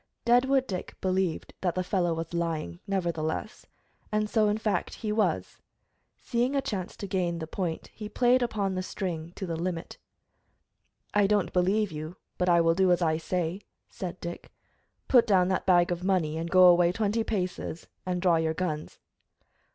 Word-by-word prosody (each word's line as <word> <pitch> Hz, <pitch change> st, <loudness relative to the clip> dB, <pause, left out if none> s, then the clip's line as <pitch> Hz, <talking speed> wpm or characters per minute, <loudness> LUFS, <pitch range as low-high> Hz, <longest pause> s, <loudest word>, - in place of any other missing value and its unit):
Deadwood 260 Hz, +2 st, +4 dB
Dick 185 Hz, -7 st, -5 dB
believed 185 Hz, -3 st, -1 dB
that 175 Hz, -3 st, 0 dB
the 185 Hz, -, 0 dB
fellow 180 Hz, -2 st, 0 dB
was 165 Hz, +1 st, -5 dB
lying, 160 Hz, -, -2 dB
nevertheless, 175 Hz, +1 st, -2 dB, 0.4 s
and 215 Hz, 0 st, +1 dB
so, 215 Hz, -1 st, +2 dB
in 210 Hz, -, +1 dB
fact, 220 Hz, -2 st, -1 dB
he 215 Hz, -2 st, -3 dB
was. 190 Hz, -, -1 dB, 0.6 s
Seeing 245 Hz, +4 st, 0 dB
a -, -, +3 dB
chance 190 Hz, -8 st, -4 dB
to -, -, -5 dB
gain 180 Hz, -3 st, -1 dB
the 160 Hz, -, -4 dB
point, 165 Hz, 0 st, -4 dB
he 210 Hz, -1 st, -7 dB
played 250 Hz, +3 st, +3 dB
upon 205 Hz, -5 st, -1 dB
the 185 Hz, -, -2 dB
string 170 Hz, -4 st, -4 dB
to 195 Hz, -, -4 dB
the 170 Hz, -2 st, -3 dB
limit. 170 Hz, 0 st, -4 dB, 1.1 s
"I 205 Hz, -1 st, +4 dB
don't 205 Hz, -1 st, +1 dB
believe 195 Hz, +3 st, +2 dB
you, 155 Hz, +3 st, -6 dB, 0.2 s
but 180 Hz, 0 st, +2 dB
I 170 Hz, -1 st, +5 dB
will 165 Hz, 0 st, +4 dB
do 185 Hz, +1 st, +3 dB
as 175 Hz, 0 st, +3 dB
I 160 Hz, -1 st, +2 dB
say," 175 Hz, +2 st, -2 dB, 0.3 s
said 180 Hz, -1 st, -6 dB
Dick. 170 Hz, 0 st, -7 dB, 0.6 s
"Put 245 Hz, -2 st, +5 dB
down 185 Hz, -3 st, +4 dB
that 190 Hz, -, -1 dB
bag 175 Hz, -1 st, +4 dB
of 175 Hz, 0 st, -2 dB
money, 180 Hz, -5 st, +1 dB
and 165 Hz, +1 st, -3 dB
go 185 Hz, +1 st, +6 dB
away 175 Hz, -1 st, +6 dB
twenty 215 Hz, +3 st, 0 dB
paces 180 Hz, -5 st, -3 dB, 0.2 s
and 180 Hz, -1 st, -2 dB
draw 175 Hz, -3 st, +4 dB
your 160 Hz, 0 st, 0 dB
guns." 155 Hz, -3 st, -3 dB
185 Hz, 175 wpm, -28 LUFS, 170-205 Hz, 1.1 s, go